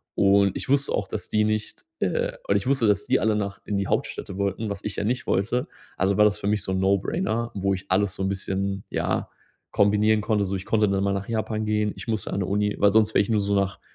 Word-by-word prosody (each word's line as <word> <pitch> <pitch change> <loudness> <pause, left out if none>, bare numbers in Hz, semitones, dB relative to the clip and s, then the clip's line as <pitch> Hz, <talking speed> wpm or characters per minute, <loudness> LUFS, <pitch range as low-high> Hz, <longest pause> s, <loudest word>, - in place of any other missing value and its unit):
Und 100 -1 +4
ich - - -6
wusste 140 +1 +2
auch, - - -1
dass - - -5
die 105 0 +2
nicht 110 0 -2 0.2
äh, - - 0 0.2
und 100 - +2
ich 100 - 0
wusste, 130 -5 +2
dass 105 - +2
die 130 +1 +2
alle 110 -1 +2
nach 100 -1 -3
in 105 - -2
die 100 -1 -1
Hauptstädte 95 - -2
wollten, 100 +2 -2
was 100 0 -6
ich 105 - -3
ja - - -1
nicht 125 +4 -1
wollte. 120 - 0 0.3
Also, 95 +1 +2
war 105 - +6
das 105 0 +2
für 100 - -3
mich 105 -1 +1
so 95 - -3
'n 95 - 0
"No-Brainer" 110 - 0
wo 100 0 0
ich 95 +1 -6
alles 95 0 +2
so 95 - -3
'n 95 - 0
bisschen, 95 0 -2
ja, - - -1 0.5
kombinieren 105 +1 +3
konnte. 105 -2 +1
So 100 +1 -2
ich 95 0 -5
konnte 110 -2 +2
dann 100 0 0
mal 100 0 +1
nach 100 0 -4
Japan 110 -1 -2
gehen. 105 -1 0
Ich - - -9
musste 110 -2 -2
an 100 - -1
'ne - - 0
Uni, 105 +2 0
weil 100 0 +5
sonst 110 +1 +3
wäre - - +6
ich - - -7
nur 110 -2 +2
so 100 0 0
nach 100 -1 0
100 Hz, 265 wpm, -25 LUFS, 100-110 Hz, 0.5 s, war